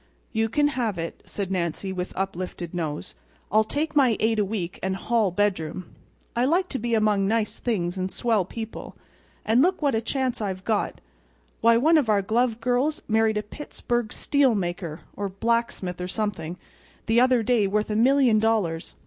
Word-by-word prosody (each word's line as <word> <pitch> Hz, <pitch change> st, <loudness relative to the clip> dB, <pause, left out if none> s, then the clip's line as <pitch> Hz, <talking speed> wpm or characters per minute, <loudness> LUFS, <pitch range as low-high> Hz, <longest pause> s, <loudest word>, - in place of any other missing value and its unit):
"You 225 Hz, 0 st, 0 dB
can 290 Hz, +6 st, +2 dB
have 235 Hz, -9 st, -1 dB
it," 165 Hz, 0 st, -5 dB
said 195 Hz, -2 st, -4 dB
Nancy, 185 Hz, +1 st, -2 dB
with 180 Hz, 0 st, -4 dB
uplifted 185 Hz, -2 st, -4 dB
nose. 155 Hz, -, -4 dB, 0.4 s
"I'll 215 Hz, +2 st, +5 dB
take 300 Hz, +8 st, -2 dB
my 255 Hz, -6 st, +4 dB
eight 220 Hz, 0 st, +2 dB
a -, -, +4 dB
week 190 Hz, -3 st, -4 dB
and 190 Hz, 0 st, -1 dB
hall 225 Hz, 0 st, +1 dB
bedroom. 185 Hz, -2 st, -1 dB, 0.4 s
I 240 Hz, -, +2 dB
like 355 Hz, +6 st, +2 dB
to 265 Hz, -, -3 dB
be 235 Hz, +1 st, 0 dB
among 210 Hz, -3 st, +2 dB
nice 220 Hz, 0 st, 0 dB
things 190 Hz, -6 st, -1 dB
and 185 Hz, +1 st, -2 dB
swell 225 Hz, -5 st, +1 dB
people. 225 Hz, +4 st, -7 dB, 0.5 s
And 225 Hz, +4 st, +4 dB
look 365 Hz, +1 st, +2 dB
what 280 Hz, -2 st, +3 dB
a 225 Hz, -, +1 dB
chance 255 Hz, 0 st, -1 dB
I've 190 Hz, -2 st, -3 dB
got! 215 Hz, -2 st, 0 dB, 0.6 s
Why, 230 Hz, 0 st, +5 dB
one 315 Hz, +6 st, +5 dB
of 255 Hz, -7 st, -1 dB
our 205 Hz, -2 st, +3 dB
glove 230 Hz, +2 st, +1 dB
girls 255 Hz, +8 st, 0 dB
married 220 Hz, 0 st, +2 dB
a 210 Hz, -, -1 dB
Pittsburg—steel 240 Hz, +1 st, 0 dB
maker, 175 Hz, -4 st, -3 dB
or 200 Hz, -1 st, -3 dB
blacksmith 200 Hz, -3 st, -1 dB
or 180 Hz, -, -3 dB
something—the 205 Hz, +3 st, -3 dB
other 255 Hz, -2 st, +4 dB
day 220 Hz, -3 st, +2 dB
worth 210 Hz, +2 st, 0 dB
a -, -, 0 dB
million 250 Hz, -1 st, +4 dB
dollars. 210 Hz, -7 st, 0 dB
220 Hz, 175 wpm, -25 LUFS, 190-240 Hz, 0.6 s, I'll